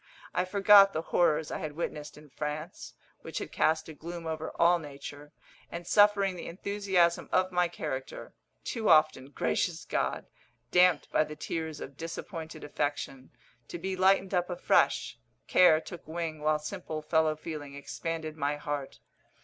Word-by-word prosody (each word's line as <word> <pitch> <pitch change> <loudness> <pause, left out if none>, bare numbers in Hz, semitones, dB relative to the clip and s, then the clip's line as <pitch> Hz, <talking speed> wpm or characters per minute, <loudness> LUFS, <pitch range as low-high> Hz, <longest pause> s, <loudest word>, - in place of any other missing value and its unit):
I 180 - +1
forgot 200 +1 +7
the 160 - -2
horrors 160 -3 +1
I - - -3
had 155 -1 -5
witnessed 150 -2 -5
in 150 0 -14
France, 150 +4 -6 0.3
which - - -7
had - - -4
cast 160 0 +1
a 160 - -8
gloom 170 +3 -8
over 160 0 -4
all 175 +1 +5
nature, 145 -1 -9 0.4
and 170 0 -6
suffering 205 -1 +4
the 175 - -7
enthusiasm 190 -2 0
of 185 0 +2
my 180 -1 +2
character 130 -6 -6 0.3
too 225 -3 -2
often, 145 -3 +4
gracious 80 - -1
God! - - -1 0.5
damped 180 -3 +4
by - - +3
the 150 0 -8
tears 160 0 -4
of 135 0 -9
disappointed 165 -1 -7
affection 145 -2 -3 0.4
to - - -6
be 190 +2 -3
lighted 190 +1 +3
up 180 0 +1
afresh, 180 0 +1 0.3
care 180 -4 +6
took 170 0 -10
wing 160 -1 -4
while 155 0 +2
simple 155 -1 -6
fellow 160 0 +2
feeling 150 -2 -7
expanded 155 +2 -5
my 145 -1 -1
heart. 145 -2 -5
160 Hz, 155 wpm, -29 LUFS, 150-180 Hz, 0.5 s, forgot